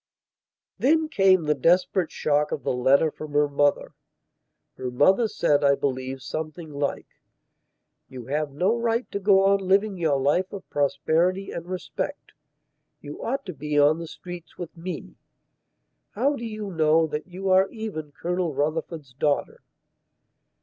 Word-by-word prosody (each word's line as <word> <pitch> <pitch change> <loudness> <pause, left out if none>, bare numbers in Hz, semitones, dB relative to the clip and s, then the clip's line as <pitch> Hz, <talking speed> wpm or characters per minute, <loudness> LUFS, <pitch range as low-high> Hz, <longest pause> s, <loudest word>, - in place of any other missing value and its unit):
Then 315 +3 +3
came 190 - +4
the 150 0 +2
desperate 170 +3 +2
shock 150 0 0
of 145 - -3
the - - 0
letter 135 +5 +3
from 155 -1 -9
her 145 0 +3
mother. 145 0 +1 0.8
Her 130 -1 -4
mother 190 - +3
said, 150 -8 +1
I 140 0 +5
believe, 130 -1 -3
something 155 +1 -6
like: 140 0 -2 1.0
"You 125 -3 -9
have 150 +3 -1
no 185 +10 +1
right 235 +1 0
to 200 - -2
go 195 -1 +4
on 200 0 +4
living 195 +1 +1
your 155 -5 +1
life 150 +8 +1
of 195 -2 -8
prosperity 170 +6 +1
and 170 0 -6
respect. 185 -1 -5 0.7
You 145 0 -9
ought 270 +4 -2
to 185 - -6
be 150 +1 -3
on 150 +3 +4
the 165 - -6
streets 175 0 -10
with 175 -1 -7
me. 165 - -7 1.0
How 275 +7 +1
do 235 - -6
you 215 -3 -5
know 160 -1 +3
that 150 +1 -5
you 190 +1 -3
are 190 +1 +5
even 205 -10 -6
Colonel 175 0 -2
Rufford's 155 -1 -3
daughter?" 145 +2 -1
165 Hz, 150 wpm, -25 LUFS, 145-190 Hz, 1.0 s, I